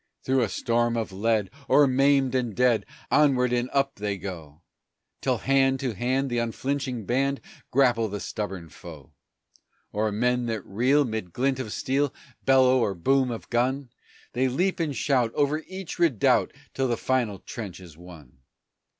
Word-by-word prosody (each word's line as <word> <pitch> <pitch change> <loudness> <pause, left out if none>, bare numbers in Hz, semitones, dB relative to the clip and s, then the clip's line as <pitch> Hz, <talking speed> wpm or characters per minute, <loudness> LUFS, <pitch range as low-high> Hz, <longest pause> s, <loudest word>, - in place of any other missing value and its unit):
Through 130 0 +2
a 115 - +1
storm 120 +1 0
of 110 -3 -3
lead, 105 0 0 0.2
o'er 145 - +6
maimed 135 0 +3
and 120 -5 -1
dead, 125 -3 +2 0.2
Onward 125 -4 +3
and 120 +1 0
up 140 0 0
they 100 -1 -2
go, 85 -5 -8 0.6
Till - - +1
hand 135 0 +2
to 130 -4 -1
hand 130 +5 -1
the 120 - +1
unflinching 125 0 -2
band 135 +4 0 0.3
Grapple 120 -4 +3
the 105 0 -5
stubborn 95 -6 -5
foe. 75 -3 -12 0.8
O'er 105 +1 0
men 125 +3 0
that 110 -4 -3
reel, 130 +8 +2
'mid 110 -6 -4
glint 130 +1 0
of 115 -5 -4
steel, 140 +4 0 0.3
Bellow 130 -1 +5
or 100 -5 0
boom 130 +9 +2
of 115 -2 -6
gun, 125 +2 0 0.4
They 130 +2 +1
leap 180 +10 0
and 155 -4 -1
shout 125 -1 +1
over 145 +1 +1
each 190 -2 -7
redoubt 155 - +3 0.2
Till 135 -1 0
the 120 -2 0
final 120 -6 0
trench 100 -1 -8
is 85 -4 -13
won! 80 -6 -14
125 Hz, 160 wpm, -26 LUFS, 105-135 Hz, 0.8 s, o'er